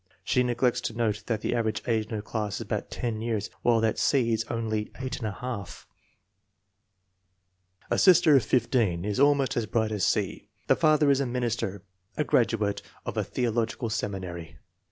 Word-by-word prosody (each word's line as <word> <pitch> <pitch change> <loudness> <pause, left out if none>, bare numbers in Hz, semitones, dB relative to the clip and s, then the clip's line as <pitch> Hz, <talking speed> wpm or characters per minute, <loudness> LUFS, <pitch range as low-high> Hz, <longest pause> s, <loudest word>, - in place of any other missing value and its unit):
She 125 - +2
neglects 125 0 +1
to 115 - -4
note 110 -2 -1
that 110 -3 -1
the - - -1
average 110 -2 -1
age 110 -2 0
in 110 - -5
her 105 - -4
class 105 -2 -3
is - - -5
about - - -3
10 115 -3 -3
years, 110 -2 -2
while 120 -2 +3
that 110 -1 +2
of - - -7
C. 120 -5 +2
is 110 0 0
only 110 -2 -2
8J. 125 -4 -5 2.1
A - - +2
sister 175 -5 +6
of 130 - +5
15 110 -7 +1
is 105 +1 -1
almost 140 -2 +3
as 115 -2 -1
bright 110 -2 0
as 105 -3 -2
C. - - 0 0.2
The - - +4
father 155 -3 +4
is 135 - +3
a 140 - 0
minister, 120 -6 -2 0.3
a 150 - +2
graduate 110 -6 +1 0.2
of - - -4
a - - 0
theological 115 -1 -1
seminary. 90 -8 -4
115 Hz, 175 wpm, -27 LUFS, 105-125 Hz, 2.1 s, sister